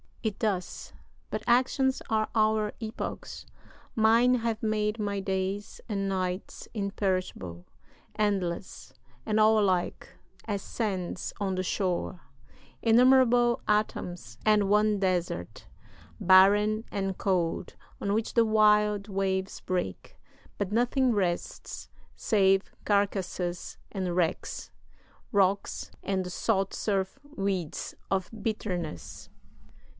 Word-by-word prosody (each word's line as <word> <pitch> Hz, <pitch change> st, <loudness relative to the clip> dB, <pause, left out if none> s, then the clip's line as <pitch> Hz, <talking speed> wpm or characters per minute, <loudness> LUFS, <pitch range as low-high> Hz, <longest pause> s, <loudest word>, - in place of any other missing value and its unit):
It 215 Hz, -3 st, -1 dB
doth; 195 Hz, -5 st, -2 dB, 0.4 s
but -, -, -3 dB
actions 260 Hz, +2 st, +3 dB
are 215 Hz, -1 st, +1 dB
our 215 Hz, -1 st, +2 dB
epochs: 220 Hz, 0 st, -6 dB, 0.5 s
mine 230 Hz, +3 st, +5 dB
Have 230 Hz, -2 st, -1 dB
made 215 Hz, 0 st, 0 dB
my 200 Hz, -1 st, -1 dB
days 195 Hz, +1 st, -3 dB
and 195 Hz, -2 st, -1 dB
nights 185 Hz, 0 st, -3 dB
imperishable, 185 Hz, -, -2 dB, 0.5 s
Endless, 185 Hz, -, -2 dB, 0.3 s
and 215 Hz, 0 st, +2 dB
all 215 Hz, 0 st, +6 dB
alike, 185 Hz, -4 st, 0 dB, 0.4 s
as 205 Hz, -3 st, -2 dB
sands 190 Hz, -6 st, -3 dB
on 195 Hz, -2 st, -1 dB
the 185 Hz, -, -1 dB
shore, 185 Hz, -1 st, -1 dB, 0.6 s
Innumerable 240 Hz, 0 st, +5 dB
atoms; 175 Hz, -, -1 dB
and 210 Hz, -2 st, +4 dB
one 210 Hz, 0 st, +3 dB
desert, 180 Hz, -, -2 dB, 0.5 s
Barren 205 Hz, +4 st, +5 dB
and 195 Hz, -2 st, -2 dB
cold, 180 Hz, -2 st, -1 dB, 0.2 s
on 200 Hz, -, -1 dB
which 220 Hz, +1 st, -1 dB
the 230 Hz, -1 st, +5 dB
wild 210 Hz, -1 st, +4 dB
waves 190 Hz, -1 st, -1 dB
break, 180 Hz, -, -3 dB, 0.4 s
But 205 Hz, -1 st, -1 dB
nothing 245 Hz, +3 st, +2 dB
rests, 180 Hz, -4 st, -3 dB, 0.3 s
save 195 Hz, -3 st, +2 dB
carcasses 190 Hz, -3 st, -1 dB
and 185 Hz, -3 st, -2 dB
wrecks, 175 Hz, -2 st, -1 dB, 0.6 s
Rocks, 200 Hz, 0 st, +1 dB
and 190 Hz, -1 st, -1 dB
the 180 Hz, -, -5 dB
salt 195 Hz, 0 st, 0 dB
surf 195 Hz, +3 st, -1 dB, 0.2 s
weeds 190 Hz, -5 st, -2 dB, 0.2 s
of 190 Hz, -2 st, 0 dB
bitterness. 175 Hz, -, -4 dB
200 Hz, 105 wpm, -28 LUFS, 185-215 Hz, 0.6 s, all